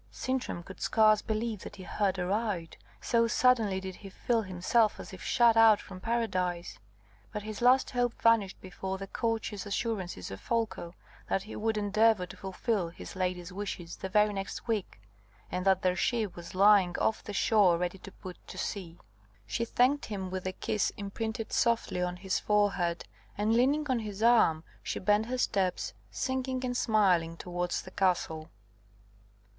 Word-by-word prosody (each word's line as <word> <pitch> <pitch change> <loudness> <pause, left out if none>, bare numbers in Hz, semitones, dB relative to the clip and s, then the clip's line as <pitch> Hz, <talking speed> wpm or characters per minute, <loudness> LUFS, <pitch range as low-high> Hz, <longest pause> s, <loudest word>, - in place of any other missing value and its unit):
Sintram 245 - -3
could 190 - -12
scarce 215 -2 +4
believe 220 -1 -2
that 205 - -9
he 190 - -10
heard 195 0 0
aright, 190 -2 -2 0.3
so 230 -1 +2
suddenly 230 -5 +3
did 190 -1 -7
he 195 - -10
feel 230 +4 0
himself 205 +3 +1
as - - -9
if 185 - -9
shut 235 -2 +4
out 225 -2 +7
from 185 -1 -10
paradise. 185 - -2 0.5
But 210 - -5
his 215 +1 -6
last 255 +2 +4
hope 245 -1 0
vanished 225 -4 +3
before 190 +1 -5
the 195 - -6
courteous 220 -1 -2
assurances 195 - -3
of 95 - -8
Folko 225 -7 -2 0.3
that 195 - 0
he 215 - -9
would 220 0 -1
endeavour 210 -1 +3
to 180 - -11
fulfil 190 -1 -2
his 170 - -10
lady's 180 -1 -2
wishes 185 -4 -5
the 190 - -5
very 210 +2 +3
next 195 +4 -5
week, 215 - -2 0.5
and 185 +1 -2
that 190 -1 +3
their 180 -1 +2
ship 215 0 0
was 175 +1 -9
lying 195 -2 +5
off 220 - 0
the 210 - -6
shore 200 -3 +4
ready 180 +2 -3
to 195 - -11
put 185 -1 -10
to - - -9
sea. 175 -4 -4 0.5
She 115 - -2
thanked 260 +5 +2
him 190 -3 -5
with 185 0 -3
a - - -1
kiss 215 +2 -1
imprinted 220 +2 -4
softly 230 -6 +1
on 180 0 -1
his 185 +1 -1
forehead; 195 -5 +1 0.3
and 210 +2 +1
leaning 280 +6 +2
on 255 -3 +1
his 210 -1 -5
arm, 220 -10 +5 0.2
she - - -3
bent 210 +3 +2
her 255 +1 -2
steps, 195 -7 0 0.2
singing 260 -1 -2
and 245 0 -2
smiling, 185 -8 +2
towards 175 0 -3
the 185 - -11
castle. 175 -5 0
205 Hz, 170 wpm, -30 LUFS, 185-225 Hz, 0.5 s, out